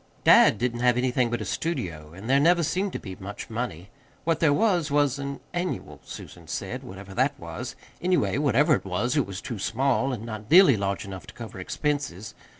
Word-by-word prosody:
Dad - - +7
didn't 120 -1 -1
have 125 0 +3
anything 125 -1 +1
but 120 - -2
a - - -3
studio, 85 - -3
and 95 +6 -10
there 135 +2 +4
never 170 +3 +4
seemed 185 +5 0
to - - -3
be 95 -3 -8
much 100 +3 -8
money. 105 -6 -4 0.3
What 165 0 +1
there 160 -3 +4
was, 175 -2 +2
was 145 -1 +2
an 140 0 -5
"annual," 175 +1 -3
Susan - - -10
said, - - -4
whatever 95 +1 -10
that 135 +6 +1
was. 85 -1 -6 0.3
Anyway, 140 - +1
whatever 145 +2 +4
it - - +1
was, 100 +8 -1
it 145 - +2
was 95 0 -6
too 115 -4 -5
small, 135 +5 +1
and 115 -3 -5
not 110 -1 -7
nearly 180 -5 +8
large 100 0 -2
enough 95 -6 -8
to - - -12
cover 110 -5 -8
expenses. 110 - -3
125 Hz, 200 wpm, -26 LUFS, 100-145 Hz, 0.3 s, nearly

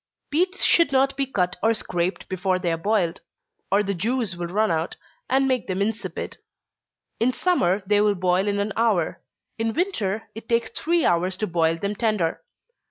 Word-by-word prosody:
_ - - -53
Beets 365 +5 +1
should 335 -4 +4
not 270 0 +3
be 275 0 -1
cut 180 -8 -1
or 225 +2 +3
scraped 180 -3 -2
before 185 0 0
they 180 -2 -1
are - - +1
boiled, 175 -1 0 0.5
or 200 +1 +4
the 200 0 -1
juice 220 +1 -1
will 175 0 -4
run 210 +3 +1
out, 165 +1 -1 0.3
and 270 0 +3
make 255 -2 0
them 185 0 -2
insipid. 215 +2 -3 0.8
In 240 +3 +3
summer, 205 - +1
they 205 +1 +3
will 210 -1 +3
boil 185 +2 +1
in 205 0 0
an 200 0 -1
hour 215 -8 +1 0.4
in 225 0 -1
winter, 225 - -1
it 225 +1 -10
takes 230 -1 +1
three 340 0 +1
hours 180 +2 +1
to 215 - -1
boil 165 -3 +1
them 200 +4 -2
tender. 210 -7 0
205 Hz, 185 wpm, -24 LUFS, 180-235 Hz, 0.8 s, should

